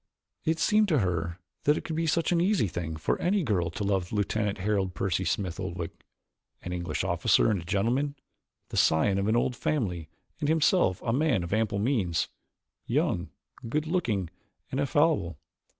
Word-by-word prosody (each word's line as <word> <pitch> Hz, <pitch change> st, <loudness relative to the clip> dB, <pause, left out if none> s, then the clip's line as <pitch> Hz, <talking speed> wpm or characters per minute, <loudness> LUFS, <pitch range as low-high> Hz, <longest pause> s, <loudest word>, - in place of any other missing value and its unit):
It 160 Hz, 0 st, +2 dB
seemed 215 Hz, +4 st, +3 dB
to 160 Hz, -6 st, +2 dB
her 85 Hz, -5 st, -1 dB, 0.3 s
that 150 Hz, +1 st, +4 dB
it -, -, -4 dB
could 160 Hz, -, -4 dB
be 165 Hz, +1 st, 0 dB
such 165 Hz, +2 st, +1 dB
an 170 Hz, -1 st, +3 dB
easy 185 Hz, -, +2 dB
thing 80 Hz, -2 st, -4 dB
for 80 Hz, -, -1 dB
any 190 Hz, +2 st, +2 dB
girl 95 Hz, -, 0 dB
to 85 Hz, -, -4 dB
love 95 Hz, -3 st, 0 dB
Lieutenant 105 Hz, 0 st, 0 dB
Harold 95 Hz, -2 st, -1 dB
Percy 95 Hz, +2 st, 0 dB
Smith 90 Hz, 0 st, -2 dB
Oldwick 85 Hz, -3 st, -4 dB, 0.7 s
an 90 Hz, -, -4 dB
English 85 Hz, -3 st, -2 dB
officer -, -, +3 dB
and 100 Hz, -4 st, 0 dB
a -, -, -11 dB
gentleman, 125 Hz, +11 st, 0 dB, 0.5 s
the -, -, -5 dB
scion 95 Hz, +5 st, +3 dB
of 100 Hz, -, 0 dB
an 110 Hz, -, +2 dB
old 120 Hz, +1 st, +1 dB
family 90 Hz, -, -2 dB, 0.3 s
and 145 Hz, -, 0 dB
himself 160 Hz, -, +3 dB
a 115 Hz, -, 0 dB
man 130 Hz, -, +2 dB
of 85 Hz, -, -4 dB
ample 110 Hz, -2 st, +1 dB
means, 100 Hz, -, 0 dB, 0.6 s
young, -, -, 0 dB, 0.4 s
good 150 Hz, +5 st, 0 dB
looking 115 Hz, -, -1 dB, 0.4 s
and 130 Hz, -, -1 dB
affable. 140 Hz, -, +2 dB
105 Hz, 175 wpm, -28 LUFS, 90-145 Hz, 0.7 s, that